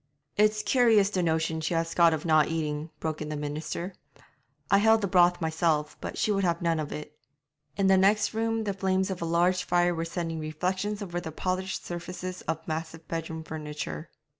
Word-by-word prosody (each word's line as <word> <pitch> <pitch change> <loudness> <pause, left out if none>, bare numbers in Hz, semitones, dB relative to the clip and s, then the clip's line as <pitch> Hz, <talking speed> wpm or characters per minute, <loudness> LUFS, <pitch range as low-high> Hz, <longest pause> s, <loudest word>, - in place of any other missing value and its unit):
'It's 215 +1 +3
curious 215 -3 +4
the 185 - 0
notion 160 -1 0
she 160 +2 -1
has 165 0 -1
got 170 -1 +5
of 160 0 -2
not 155 -2 +4
eating,' 155 -1 -2
broke 155 -1 -3
in 150 - -4
the 155 - -3
minister. 155 +5 -4 0.8
'I 200 - +6
held 220 +1 +5
the 200 - 0
broth 175 -1 +4
myself, 160 -2 0
but - - -5
she 215 - +1
would 195 -1 +1
have 170 -2 +1
none 165 -2 +1
of 150 -1 -4
it.' 150 0 -7 0.6
In 200 - +2
the 190 0 +6
next 205 +2 +3
room 225 0 0
the 205 -2 -1
flames 190 0 0
of 185 - -5
a - - -1
large 175 +2 +2
fire 175 0 +2
were 165 -1 -2
sending 165 -1 -3
reflections 185 +7 -2
over 175 -2 -4
the 160 -2 -6
polished 185 +3 -2
surfaces 180 +1 -5
of 160 -1 -3
massive 160 0 -5
bedroom 160 -1 -4
furniture. 150 - -6
170 Hz, 195 wpm, -28 LUFS, 160-190 Hz, 0.8 s, I